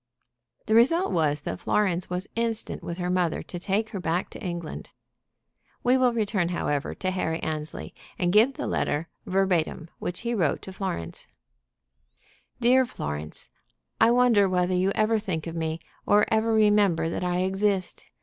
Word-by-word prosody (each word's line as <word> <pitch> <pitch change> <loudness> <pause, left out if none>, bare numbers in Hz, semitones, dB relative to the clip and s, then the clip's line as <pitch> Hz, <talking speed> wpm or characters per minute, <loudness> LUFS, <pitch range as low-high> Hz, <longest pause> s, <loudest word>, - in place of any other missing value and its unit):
The 220 - 0
result 305 +11 +4
was 150 -3 +1
that - - -5
Florence 185 -4 0
was 180 +1 -3
instant 230 -1 -2
with 170 - -4
her 180 -1 -2
mother 180 -3 0
to 175 - -7
take 210 +4 -1
her 195 - -4
back 175 +1 -1
to - - -10
England. 175 -5 -5 0.9
We 250 +1 +4
will 255 -1 +4
return, 210 -6 0
however, 145 -5 -2
to 185 - -2
Harry 165 -3 -1
Annesley, 155 -1 -4 0.2
and 175 0 0
give 230 +6 +5
the - - -4
letter, 155 +3 -1 0.2
verbatim, 180 -4 0
which 175 - -4
he 235 0 -2
wrote 175 -10 0
to 190 - -8
Florence: 85 - -5 1.3
"DEAR 255 +2 +5
FLORENCE, 75 - -6 0.5
I 225 - +6
wonder 235 -5 +4
whether 180 0 +1
you 185 +1 +2
ever 220 +1 +2
think 185 -7 -3
of 165 -1 -5
me 160 0 -2 0.3
or 210 0 +5
ever 220 +1 +2
remember 205 -6 +3
that 165 - -3
I 180 0 0
exist? 195 0 -1
185 Hz, 160 wpm, -26 LUFS, 170-220 Hz, 1.3 s, I